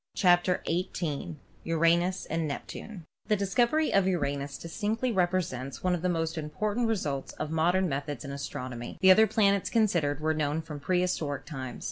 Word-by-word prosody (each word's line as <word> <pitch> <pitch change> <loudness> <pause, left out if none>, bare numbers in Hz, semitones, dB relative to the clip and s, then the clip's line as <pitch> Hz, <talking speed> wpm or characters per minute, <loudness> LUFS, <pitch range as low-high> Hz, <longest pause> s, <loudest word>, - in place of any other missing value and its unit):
CHAPTER 180 0 +3
XVIII 170 -2 -2 0.3
URANUS 170 +3 +2
AND 160 0 -1
NEPTUNE 175 +5 -7 0.2
The 210 - +3
discovery 240 +10 +1
of 195 -1 +4
Uranus 140 -5 -1
distinctly 220 +8 -2
represents 175 - -1
one 180 -1 +2
of 175 - -1
the 180 - +1
most 165 -1 -1
important 210 +10 -1
results 150 -11 -2
of 155 0 -5
modern 175 +4 +2
methods 145 -1 -4
in 140 - -5
astron 140 -2 -5
omy. 120 0 -7
The 190 - +8
other 220 +4 +7
planets 200 -2 +2
considered 170 - +1
were 155 +1 +1
known 155 +1 -1
from 150 -2 -7
pre 180 +5 +1
historic 150 -6 -2
times. 130 -5 -6
170 Hz, 165 wpm, -29 LUFS, 145-190 Hz, 0.3 s, The